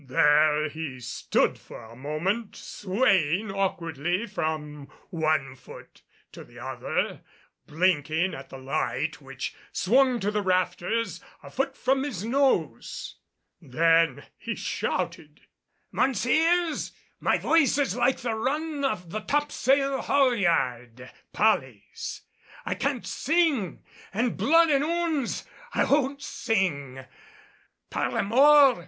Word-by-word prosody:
There 150 Hz, +1 st, +4 dB
he 150 Hz, -4 st, -6 dB
stood 125 Hz, 0 st, 0 dB
for -, -, -12 dB
a 115 Hz, +1 st, -13 dB
moment 165 Hz, -, -2 dB
swaying 195 Hz, -, 0 dB
awkwardly 175 Hz, -1 st, -1 dB
from 155 Hz, -7 st, -4 dB, 0.2 s
one 155 Hz, -5 st, 0 dB
foot -, -, -14 dB, 0.3 s
to -, -, -10 dB
the -, -, -17 dB
other, -, -, -3 dB, 0.5 s
blinking 160 Hz, +1 st, +1 dB
at 135 Hz, -3 st, -9 dB
the 135 Hz, -, -9 dB
light 135 Hz, +2 st, -2 dB
which 135 Hz, -1 st, -6 dB, 0.2 s
swung 255 Hz, +4 st, +3 dB
to 205 Hz, +2 st, 0 dB
the 210 Hz, 0 st, 0 dB
rafters 185 Hz, +1 st, -1 dB, 0.2 s
a -, -, -11 dB
foot 270 Hz, +1 st, -2 dB
from 265 Hz, +1 st, +1 dB
his 245 Hz, -9 st, -4 dB
nose. 270 Hz, +3 st, 0 dB, 0.4 s
Then 165 Hz, +3 st, +2 dB, 0.2 s
he -, -, -4 dB
shouted, -, -, -3 dB, 0.5 s
"Mounseers, 315 Hz, -, +1 dB, 0.3 s
my -, -, +2 dB
voice 320 Hz, -4 st, +3 dB
is 285 Hz, -2 st, 0 dB
like 265 Hz, -, +1 dB
the 240 Hz, -2 st, -1 dB
run 290 Hz, +6 st, -2 dB
of 180 Hz, -11 st, -2 dB
the 215 Hz, -, -2 dB
topsail 275 Hz, +1 st, +1 dB
haulyard 145 Hz, -, +1 dB, 0.2 s
pollys. 130 Hz, -, -1 dB, 0.4 s
I -, -, -1 dB
can't 275 Hz, -3 st, -2 dB
sing 300 Hz, -, 0 dB, 0.3 s
an' 235 Hz, +2 st, +1 dB
blood 330 Hz, +1 st, +4 dB
an' 275 Hz, -1 st, +3 dB
ouns! 320 Hz, -4 st, -1 dB, 0.3 s
I -, -, +3 dB
won't 280 Hz, 0 st, +1 dB
sing." 140 Hz, -, -2 dB, 0.9 s
"Par -, -, -1 dB
la -, -, 0 dB
mort! 270 Hz, +3 st, +6 dB
195 Hz, 115 wpm, -26 LUFS, -, 0.9 s, mort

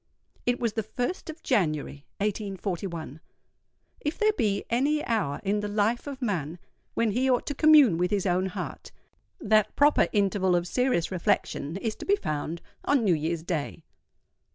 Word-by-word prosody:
It 245 Hz, 0 st, +2 dB
was 230 Hz, -3 st, 0 dB
the 220 Hz, -, -1 dB
1st 250 Hz, -, -4 dB
of 315 Hz, +1 st, -8 dB
January, 155 Hz, -, -1 dB
1841. 190 Hz, -, -3 dB, 0.8 s
If 300 Hz, +2 st, -3 dB
there 430 Hz, 0 st, +3 dB
be 210 Hz, -, 0 dB
any 285 Hz, +6 st, +1 dB
hour 215 Hz, -, -1 dB
in 205 Hz, +1 st, +1 dB
the 210 Hz, -, -3 dB
life 215 Hz, +5 st, 0 dB
of 275 Hz, -2 st, -6 dB
man 170 Hz, -, -2 dB, 0.4 s
when 230 Hz, -2 st, +2 dB
he 255 Hz, +5 st, +1 dB
ought 250 Hz, -2 st, +2 dB
to 285 Hz, -, -2 dB
commune 290 Hz, -, +6 dB
with 180 Hz, 0 st, +1 dB
his 205 Hz, -2 st, 0 dB
own 185 Hz, 0 st, +1 dB
heart, 185 Hz, -, -6 dB, 0.5 s
that 215 Hz, -, +2 dB
proper 290 Hz, +1 st, +4 dB
interval 195 Hz, -3 st, +2 dB
of 175 Hz, 0 st, 0 dB
serious 250 Hz, -7 st, +1 dB
reflection 165 Hz, -3 st, -1 dB
is 215 Hz, +2 st, -3 dB
to -, -, -8 dB
be 400 Hz, -, +5 dB
found 155 Hz, -, -4 dB, 0.2 s
on 285 Hz, -4 st, +2 dB
New 195 Hz, -5 st, +4 dB
Year's 160 Hz, +1 st, -2 dB
Day. 165 Hz, -2 st, -3 dB
205 Hz, 165 wpm, -27 LUFS, 175-245 Hz, 0.8 s, commune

